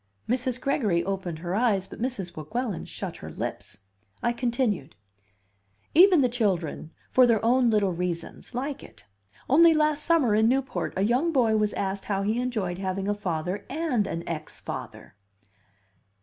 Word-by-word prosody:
Mrs. 250 Hz, +1 st, -1 dB
Gregory 215 Hz, -, +1 dB
opened 185 Hz, -3 st, -3 dB
her 175 Hz, +2 st, -4 dB
eyes, 200 Hz, -3 st, +1 dB
but -, -, -10 dB
Mrs. 235 Hz, -9 st, -3 dB
Weguelin 200 Hz, -, -3 dB
shut -, -, -6 dB
her -, -, -8 dB
lips. -, -, -6 dB, 0.4 s
I 235 Hz, -, +2 dB
continued: 235 Hz, -, -1 dB, 1.0 s
"Even 355 Hz, -1 st, +7 dB
the 255 Hz, -, +4 dB
children, 190 Hz, -, -1 dB, 0.2 s
for 255 Hz, -1 st, +6 dB
their 225 Hz, -2 st, +2 dB
own 245 Hz, +1 st, +4 dB
little 210 Hz, -4 st, +2 dB
reasons, 175 Hz, +6 st, -5 dB
like 275 Hz, +2 st, -3 dB
it. -, -, -15 dB, 0.4 s
Only 325 Hz, +4 st, +6 dB
last 305 Hz, -1 st, +2 dB
summer, 310 Hz, -10 st, +3 dB
in 220 Hz, +2 st, +4 dB
Newport, 265 Hz, +1 st, -1 dB
a 190 Hz, -, +2 dB
young 250 Hz, +10 st, +2 dB
boy 235 Hz, -7 st, +3 dB
was 210 Hz, -1 st, +1 dB
asked 195 Hz, 0 st, -3 dB
how 195 Hz, -1 st, -1 dB
he 220 Hz, +4 st, 0 dB
enjoyed 210 Hz, -8 st, -2 dB
having 190 Hz, 0 st, -2 dB
a 205 Hz, -, +2 dB
father 180 Hz, -2 st, -3 dB
and 280 Hz, -9 st, 0 dB
an 165 Hz, -, -5 dB
ex 155 Hz, -2 st, -5 dB
father." -, -, -7 dB
220 Hz, 160 wpm, -26 LUFS, 190-255 Hz, 1.0 s, Even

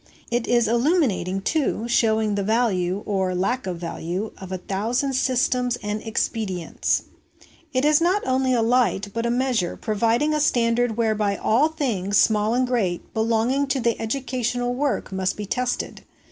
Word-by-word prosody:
It 240 Hz, 0 st, 0 dB
is 240 Hz, -2 st, +3 dB
illuminating, 235 Hz, -, +1 dB
too, 265 Hz, -2 st, 0 dB
showing 220 Hz, -2 st, +2 dB
the 200 Hz, -, 0 dB
value, 200 Hz, -3 st, 0 dB
or 190 Hz, -2 st, -1 dB
lack 240 Hz, +6 st, -1 dB
of 180 Hz, -2 st, -3 dB
value, 175 Hz, +4 st, -4 dB
of 190 Hz, -1 st, -9 dB
a 185 Hz, -, -2 dB
thousand 225 Hz, +9 st, -1 dB
systems 250 Hz, -1 st, +1 dB
and 210 Hz, +1 st, -3 dB
expedients. 210 Hz, -6 st, -1 dB, 0.7 s
It 255 Hz, 0 st, +1 dB
is 300 Hz, +1 st, +4 dB
not 365 Hz, +5 st, +2 dB
only 260 Hz, 0 st, +1 dB
a 240 Hz, -3 st, +2 dB
light, 230 Hz, -4 st, +2 dB
but 230 Hz, 0 st, -1 dB
a -, -, 0 dB
measure, 245 Hz, -7 st, 0 dB
providing 230 Hz, +7 st, +1 dB
a 305 Hz, -, +1 dB
standard 240 Hz, -4 st, +1 dB
whereby 215 Hz, -3 st, +1 dB
all 245 Hz, +8 st, +3 dB
things, 225 Hz, -, -1 dB
small 215 Hz, +2 st, +3 dB
and 255 Hz, +1 st, +2 dB
great, 215 Hz, -9 st, -2 dB
belonging 230 Hz, +5 st, +1 dB
to 245 Hz, -5 st, 0 dB
educational 245 Hz, 0 st, -2 dB
work 275 Hz, -3 st, -1 dB
must 190 Hz, 0 st, -1 dB
be 210 Hz, -, -4 dB
tested. 250 Hz, +4 st, -3 dB
230 Hz, 155 wpm, -23 LUFS, 205-255 Hz, 0.7 s, is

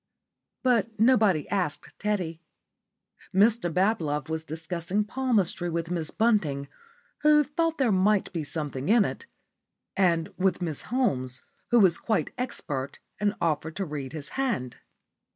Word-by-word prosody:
But 230 Hz, -4 st, +1 dB
nobody 215 Hz, -, +4 dB
asked 155 Hz, -7 st, -2 dB
Teddy. 180 Hz, -6 st, -2 dB, 0.9 s
Mr 205 Hz, -1 st, +3 dB
Bablove 160 Hz, -6 st, 0 dB
was 160 Hz, 0 st, -2 dB
discussing 165 Hz, +5 st, -2 dB
palmistry 210 Hz, -7 st, 0 dB
with 165 Hz, 0 st, -3 dB
Miss 165 Hz, -3 st, -1 dB
Bunting, 170 Hz, -12 st, +1 dB, 0.5 s
who 300 Hz, 0 st, +5 dB
thought 325 Hz, +3 st, -1 dB
there 260 Hz, -5 st, +2 dB
might 195 Hz, +1 st, +2 dB
be 165 Hz, -3 st, -2 dB
something 145 Hz, -1 st, -4 dB
in 220 Hz, -2 st, +5 dB
it, 465 Hz, -, -5 dB, 0.7 s
and 170 Hz, -4 st, +2 dB
with 185 Hz, -1 st, +2 dB
Miss 165 Hz, -5 st, -3 dB
Holmes, 130 Hz, -, 0 dB, 0.3 s
who 240 Hz, -, +5 dB
was 185 Hz, -5 st, +4 dB
quite 220 Hz, -, 0 dB
expert 145 Hz, -, -4 dB, 0.2 s
and 205 Hz, 0 st, +1 dB
offered 160 Hz, -1 st, -1 dB
to 195 Hz, -, -2 dB
read 145 Hz, -4 st, -5 dB
his 150 Hz, -3 st, -3 dB
hand. 230 Hz, -, -2 dB
185 Hz, 135 wpm, -27 LUFS, 155-220 Hz, 0.9 s, who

